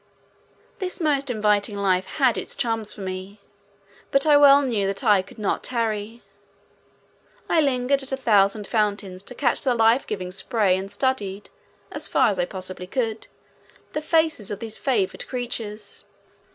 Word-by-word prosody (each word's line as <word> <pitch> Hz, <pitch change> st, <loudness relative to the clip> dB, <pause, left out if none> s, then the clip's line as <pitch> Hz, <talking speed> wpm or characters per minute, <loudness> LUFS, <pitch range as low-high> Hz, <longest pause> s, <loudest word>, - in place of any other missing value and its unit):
This 370 Hz, -1 st, -2 dB
most 285 Hz, -4 st, +1 dB
inviting 210 Hz, -2 st, +1 dB
life 190 Hz, -2 st, +1 dB
had 260 Hz, -6 st, +2 dB
its 185 Hz, -, -4 dB
charms 225 Hz, -2 st, -1 dB
for -, -, -7 dB
me, 190 Hz, +2 st, -6 dB, 0.7 s
but 275 Hz, +1 st, +2 dB
I 300 Hz, -1 st, +6 dB
well 285 Hz, 0 st, +7 dB
knew 220 Hz, -7 st, 0 dB
that 195 Hz, 0 st, -3 dB
I 205 Hz, -3 st, +5 dB
could 190 Hz, -, -16 dB
not 210 Hz, -3 st, -1 dB
tarry. 225 Hz, -1 st, -3 dB, 1.2 s
I 330 Hz, -, +3 dB
lingered 275 Hz, -1 st, +1 dB
at 270 Hz, +1 st, -4 dB
a 265 Hz, -, -1 dB
thousand 210 Hz, -4 st, +2 dB
fountains 205 Hz, -4 st, -1 dB
to 250 Hz, +5 st, -8 dB
catch 245 Hz, -2 st, +1 dB
the 255 Hz, -3 st, +1 dB
life 225 Hz, +3 st, +3 dB
giving 185 Hz, -3 st, -4 dB
spray 200 Hz, -1 st, +1 dB
and 190 Hz, +1 st, -5 dB
studied, 210 Hz, -7 st, -2 dB, 0.4 s
as -, -, -1 dB
far -, -, +3 dB
as 195 Hz, -3 st, -2 dB
I 175 Hz, -, +2 dB
possibly 185 Hz, -1 st, -6 dB
could, 225 Hz, 0 st, -2 dB, 0.7 s
the 305 Hz, -, -2 dB
faces 315 Hz, -, +1 dB
of 205 Hz, -, -4 dB
these 220 Hz, 0 st, -3 dB
favored 225 Hz, -9 st, -1 dB
creatures. 230 Hz, -4 st, -5 dB
220 Hz, 160 wpm, -23 LUFS, 200-260 Hz, 1.2 s, well